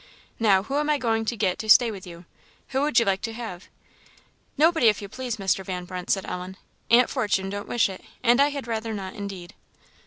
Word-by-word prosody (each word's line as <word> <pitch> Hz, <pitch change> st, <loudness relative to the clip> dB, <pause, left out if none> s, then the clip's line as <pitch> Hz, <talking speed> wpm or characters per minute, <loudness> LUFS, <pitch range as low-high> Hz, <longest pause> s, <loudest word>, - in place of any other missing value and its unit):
Now, 200 Hz, -4 st, +4 dB
who 275 Hz, +7 st, -3 dB
am 300 Hz, +1 st, 0 dB
I 300 Hz, -, +3 dB
going 225 Hz, -4 st, 0 dB
to 235 Hz, +1 st, -2 dB
get 190 Hz, -4 st, 0 dB
to 220 Hz, -, -5 dB
stay 235 Hz, +1 st, +7 dB
with 195 Hz, -3 st, -9 dB
you? 170 Hz, 0 st, -11 dB, 0.4 s
Who 265 Hz, 0 st, 0 dB
would 290 Hz, -4 st, +1 dB
you 230 Hz, -, +5 dB
like 195 Hz, -1 st, +1 dB
to 225 Hz, -, -4 dB
have." 220 Hz, -6 st, -7 dB, 0.9 s
"Nobody, 320 Hz, -4 st, +4 dB
if 210 Hz, -2 st, +3 dB
you 200 Hz, -, -7 dB
please, 245 Hz, +2 st, -5 dB
Mr. 195 Hz, -1 st, 0 dB
Van 180 Hz, -1 st, -5 dB
Brunt," 180 Hz, 0 st, -7 dB
said 195 Hz, -, +1 dB
Ellen; 180 Hz, +1 st, -6 dB, 0.3 s
"Aunt 240 Hz, +2 st, +5 dB
Fortune 205 Hz, -6 st, 0 dB
don't 205 Hz, 0 st, -5 dB
wish 240 Hz, -, +2 dB
it, 190 Hz, -1 st, -8 dB, 0.2 s
and 240 Hz, +2 st, +5 dB
I 285 Hz, -, +6 dB
had 280 Hz, -3 st, -5 dB
rather 225 Hz, -1 st, -3 dB
not, 190 Hz, -2 st, -6 dB
indeed." 195 Hz, -3 st, -7 dB
215 Hz, 220 wpm, -25 LUFS, 190-240 Hz, 0.9 s, stay